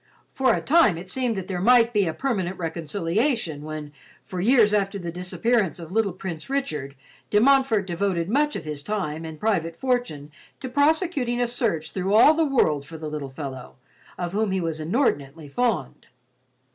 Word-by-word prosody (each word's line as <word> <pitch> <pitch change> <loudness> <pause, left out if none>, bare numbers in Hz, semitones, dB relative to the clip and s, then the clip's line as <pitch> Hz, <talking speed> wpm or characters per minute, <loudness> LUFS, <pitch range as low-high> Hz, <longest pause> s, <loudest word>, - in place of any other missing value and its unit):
For 260 -2 +3
a - - -3
time 295 - +4
it 180 +2 -8
seemed 250 0 0
that 190 -2 -5
there 180 -2 -3
might 240 +2 +5
be 205 -4 +2
a 160 - -1
permanent 195 -9 -2
reconciliation 170 - -1
when, 150 -1 -7 0.3
for 180 -1 -4
years 220 -1 +4
after 200 -1 +1
the 170 -3 -5
disappearance 185 +2 0
of 165 -2 -9
the - - -10
little 220 -2 +2
Prince 175 -1 -7
Richard, 150 - -3 0.3
De 210 - +4
Montfort 255 -4 +4
devoted 175 -1 -1
much 295 +7 +1
of - - -5
his 150 -2 -5
time 160 -3 -3
and 160 -1 -8
private 170 -7 0
fortune 245 - -2 0.3
to 260 - -6
prosecuting 285 -3 +1
a 245 - +2
search 220 -10 -1
through 190 +2 0
all 265 +8 +8
the 325 +1 +2
world 155 - +2
for 160 +3 -10
the 155 -1 -6
little 145 -3 -5
fellow, 130 -2 -8 0.4
of 175 -1 -3
whom 215 +2 0
he 190 0 0
was 165 -2 -3
inordinately 155 - -1
fond. 190 - -2
190 Hz, 185 wpm, -24 LUFS, 160-240 Hz, 0.4 s, all